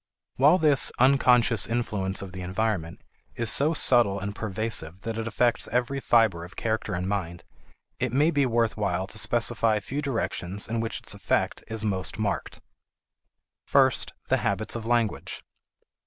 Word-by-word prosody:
While 145 +7 +5
this 150 -6 +4
"unconscious 125 -4 +3
influence 105 -5 -2
of 95 - -9
the 90 0 -8
environment" 90 -2 -3 0.3
is 115 -2 0
so 155 +4 +2
subtle 120 -9 +4
and 100 +1 -4
pervasive 100 -5 -3
that 115 +1 -4
it 115 - -4
affects 120 +2 +1
every 125 +3 -1
fiber 110 -10 +2
of 90 +2 -12
character 110 -5 -2
and 90 +1 -3
mind, 85 -4 -3 0.6
it 125 -2 -1
may 145 +6 +3
be 140 -4 +2
worth 115 -2 +1
while 95 -3 -1
to 110 - -3
specify 115 -1 +2
a - - 0
few 135 +8 -5
directions 105 -8 -3
in 115 +1 -2
which 115 0 -3
its - - -4
effect - - -1
is 110 -1 -5
most 95 -3 -2
marked. 100 -10 -3 1.1
First, 130 -3 +3
the - - +2
habits 100 +3 -2
of 115 -1 -5
language. 120 -3 -1
110 Hz, 160 wpm, -26 LUFS, 100-120 Hz, 1.1 s, While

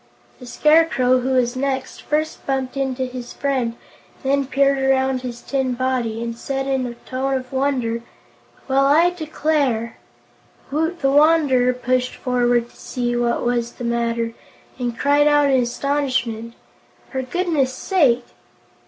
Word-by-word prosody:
The 250 - -11
Scarecrow, 300 -4 +3
who 255 +1 -2
was 250 -1 +1
next, 265 0 -3
first 310 +1 -2
bumped 265 -1 -1
into 265 -1 -1
his 250 -1 -7
friend 260 -5 -1 0.5
and 270 - 0
then 280 -1 +1
peered 275 0 +2
around 265 -1 +1
his 245 -2 -6
tin 265 -2 -1
body, 240 -3 -1
and 230 0 -4
said 270 +3 -3
in 265 -2 0
a 240 - -7
tone 265 +1 -1
of 255 0 -5
wonder: 260 -4 0 0.7
"Well, 275 0 +3
I 325 +5 +5
declare!" 300 -8 -1 0.7
Woot 320 +4 -1
the 270 - +2
Wanderer 290 -4 +4
pushed 250 0 -1
forward 245 -1 +1
to - - -23
see 240 -1 -3
what 240 0 0
was 240 -1 0
the - - -9
matter, 235 -1 -1 0.5
and 240 -2 -3
cried 290 +1 +3
out 290 -1 +4
in 260 -1 +4
astonishment: 240 -3 -1 0.6
"For 265 - -2
goodness' 290 -1 0
sake!" 255 -5 +2
260 Hz, 145 wpm, -21 LUFS, 245-280 Hz, 0.7 s, I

